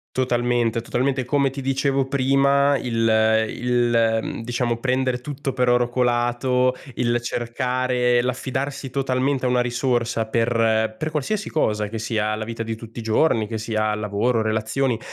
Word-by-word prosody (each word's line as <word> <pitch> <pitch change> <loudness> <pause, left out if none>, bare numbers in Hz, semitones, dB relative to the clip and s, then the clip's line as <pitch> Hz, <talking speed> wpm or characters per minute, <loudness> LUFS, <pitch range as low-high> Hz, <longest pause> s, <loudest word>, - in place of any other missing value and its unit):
Totalmente, 120 -2 +1
totalmente, 130 +2 -1
come 140 +2 +2
ti 135 +2 -8
dicevo 135 0 0
prima, 140 +1 +3
il 110 -2 +2
il, 120 -2 +1
mhmm, 115 - -5
diciamo, 120 0 -1
prendere 130 +1 0
tutto 140 0 -4
per 125 -1 +1
oro 120 0 +3
colato, 125 +1 +1 0.2
il 120 0 +1
cercare 125 +1 0
l'affidarsi 135 +2 -3
totalmente 130 0 0
a - - +1
una 125 0 +2
risorsa 120 -2 0
per 115 -1 +1
per 155 - -2
qualsiasi 165 +8 -2
cosa, 105 -8 0
che 115 - -5
sia 110 -1 -1
la 110 - -4
vita 115 0 -6
di 115 0 -3
tutti 115 +1 -10
i - - -4
giorni, 110 0 +2
che 110 - -4
sia 110 -1 -1
lavoro, 105 +3 0
relazioni, 110 +3 0
120 Hz, 150 wpm, -22 LUFS, 115-130 Hz, 0.2 s, prima